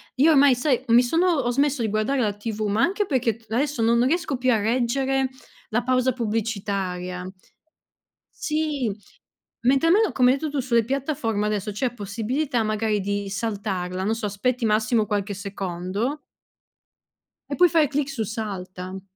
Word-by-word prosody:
io 300 Hz, +5 st, +5 dB
ormai, 280 Hz, -2 st, +6 dB
sai, 255 Hz, -1 st, +1 dB
mi 235 Hz, +2 st, +7 dB
sono 330 Hz, +9 st, +2 dB
ho 240 Hz, -2 st, 0 dB
smesso 280 Hz, 0 st, +1 dB
di 220 Hz, -, 0 dB
guardare 215 Hz, +6 st, 0 dB
la 210 Hz, -3 st, +1 dB
TV, 215 Hz, +1 st, -5 dB
ma 210 Hz, +3 st, +1 dB
anche 400 Hz, +4 st, +2 dB
perché 245 Hz, -, 0 dB
t 230 Hz, -, -25 dB
adesso 265 Hz, +1 st, 0 dB
non 235 Hz, +2 st, +3 dB
riesco 315 Hz, -2 st, 0 dB
più 255 Hz, 0 st, +2 dB
a 225 Hz, -, +4 dB
reggere 260 Hz, +4 st, +1 dB, 0.4 s
la 235 Hz, +2 st, +1 dB
pausa 255 Hz, 0 st, +2 dB
pubblicitaria. 200 Hz, -5 st, -3 dB, 1.2 s
Sì. 300 Hz, -7 st, 0 dB, 0.8 s
Mentre 275 Hz, +5 st, +4 dB
almeno, 405 Hz, +1 st, +4 dB
come 250 Hz, 0 st, +4 dB
hai 275 Hz, -, +1 dB
detto 310 Hz, 0 st, -3 dB
tu 285 Hz, -1 st, -2 dB
sulle 235 Hz, -3 st, +2 dB
piattaforme 255 Hz, -5 st, -1 dB
adesso, 210 Hz, -1 st, -1 dB
c'è 245 Hz, +4 st, -2 dB
possibilità 235 Hz, +5 st, -2 dB
magari 215 Hz, -1 st, 0 dB
di 200 Hz, 0 st, -2 dB
saltarla, 195 Hz, -4 st, -3 dB
non 220 Hz, +3 st, 0 dB
so, 220 Hz, -2 st, -3 dB
aspetti 235 Hz, +4 st, -1 dB
massimo 215 Hz, +1 st, +2 dB
qualche 205 Hz, -1 st, -2 dB
secondo 200 Hz, -, -3 dB, 1.3 s
e 280 Hz, -, -2 dB
puoi 355 Hz, -1 st, +5 dB
fare 320 Hz, -3 st, +3 dB
clic 285 Hz, 0 st, -1 dB
su 240 Hz, -5 st, -2 dB
"salta". 190 Hz, -4 st, -6 dB
230 Hz, 160 wpm, -24 LUFS, 205-270 Hz, 1.3 s, mi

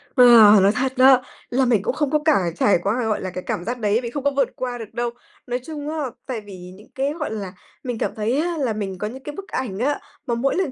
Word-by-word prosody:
Ờ, 250 Hz, -, +7 dB, 0.4 s
nói 200 Hz, +1 st, +5 dB
thật 260 Hz, +4 st, -1 dB
đó, 260 Hz, 0 st, +7 dB, 0.3 s
là 255 Hz, +1 st, +2 dB
mình 230 Hz, -5 st, +3 dB
cũng -, -, -1 dB
không 295 Hz, -1 st, -1 dB
có 305 Hz, -, +3 dB
cả 245 Hz, -, +3 dB
trải 200 Hz, -3 st, +3 dB
qua, 225 Hz, +4 st, 0 dB
gọi 215 Hz, -, -1 dB
là, 185 Hz, -, -3 dB
cái 185 Hz, 0 st, -6 dB
cảm 175 Hz, -, -2 dB
giác 245 Hz, +1 st, -3 dB
đấy, 210 Hz, +1 st, +2 dB
vì 235 Hz, -, -3 dB
không 280 Hz, +2 st, -5 dB
có 285 Hz, -, +2 dB
vượt 275 Hz, -2 st, +1 dB
qua 250 Hz, -1 st, -4 dB
được 220 Hz, -3 st, -9 dB
đâu. 240 Hz, 0 st, -1 dB, 0.4 s
Nói 245 Hz, +1 st, -2 dB
chung 300 Hz, -2 st, -6 dB
á, 320 Hz, -, -4 dB, 0.3 s
tại 245 Hz, -5 st, -4 dB
vì 185 Hz, -3 st, -11 dB
những 210 Hz, -, -17 dB
cái, 275 Hz, +2 st, -1 dB
gọi 300 Hz, -8 st, -3 dB
là, 200 Hz, -4 st, -5 dB, 0.3 s
mình 245 Hz, -3 st, -3 dB
cảm -, -, -2 dB
thấy 225 Hz, +5 st, 0 dB
á, 340 Hz, 0 st, -1 dB
là 255 Hz, -6 st, 0 dB
mình 195 Hz, -3 st, -4 dB
có 210 Hz, +4 st, -3 dB
những 265 Hz, +4 st, -9 dB
cái 295 Hz, -, -7 dB
bức 395 Hz, 0 st, -8 dB
ảnh 215 Hz, -6 st, -4 dB
á, 285 Hz, +4 st, 0 dB, 0.3 s
mà 235 Hz, -, 0 dB
mỗi 270 Hz, +4 st, 0 dB
lần 370 Hz, -8 st, 0 dB
245 Hz, 275 wpm, -22 LUFS, 210-275 Hz, 0.4 s, Ờ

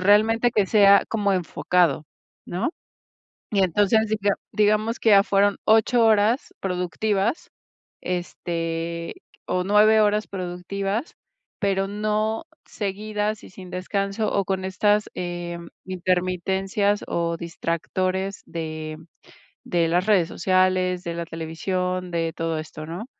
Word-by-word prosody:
realmente, 220 Hz, +5 st, +4 dB
que 205 Hz, -2 st, +2 dB
sea 200 Hz, -1 st, +6 dB
como 205 Hz, -3 st, +1 dB
enfocado, 175 Hz, -4 st, +1 dB, 0.4 s
¿no? 180 Hz, -, -1 dB, 0.8 s
Y 200 Hz, -2 st, +2 dB
entonces, 205 Hz, +4 st, +3 dB
así 220 Hz, 0 st, -1 dB
que 200 Hz, -, 0 dB
ah, -, -, +2 dB, 0.2 s
digamos 215 Hz, +2 st, +2 dB
que -, -, +2 dB
ya 200 Hz, -1 st, +8 dB
fueron 200 Hz, 0 st, +3 dB
8 225 Hz, +2 st, +4 dB
horas 220 Hz, +3 st, +3 dB
productivas, 195 Hz, -, -1 dB, 0.5 s
este, 170 Hz, -2 st, -3 dB, 0.3 s
o 180 Hz, 0 st, 0 dB
9 210 Hz, +2 st, +5 dB
horas 210 Hz, 0 st, +2 dB
productivas, 195 Hz, -, -4 dB, 0.4 s
pero 195 Hz, -1 st, +1 dB
no 215 Hz, +4 st, -1 dB, 0.2 s
seguidas 210 Hz, +1 st, -3 dB
y -, -, -11 dB
sin 185 Hz, -1 st, -11 dB
descanso 200 Hz, +3 st, -2 dB
o 200 Hz, -, +1 dB
con 190 Hz, 0 st, -2 dB
estas, 205 Hz, +2 st, +2 dB
eh, 175 Hz, -1 st, -4 dB, 0.3 s
intermitencias 185 Hz, +2 st, 0 dB
o 170 Hz, 0 st, -1 dB
distractores 185 Hz, +3 st, -2 dB
de 155 Hz, -1 st, -5 dB, 0.7 s
de 170 Hz, -2 st, +1 dB
las 175 Hz, +2 st, +2 dB
redes 190 Hz, -6 st, +4 dB
sociales, 185 Hz, -1 st, +1 dB
de 170 Hz, -, -3 dB
la 170 Hz, 0 st, -3 dB
televisión, 180 Hz, +3 st, -3 dB
de 165 Hz, -1 st, -1 dB
todo 165 Hz, -1 st, -2 dB
esto, 155 Hz, 0 st, -7 dB
¿no?, 175 Hz, +8 st, -6 dB
190 Hz, 125 wpm, -24 LUFS, 175-210 Hz, 0.8 s, ya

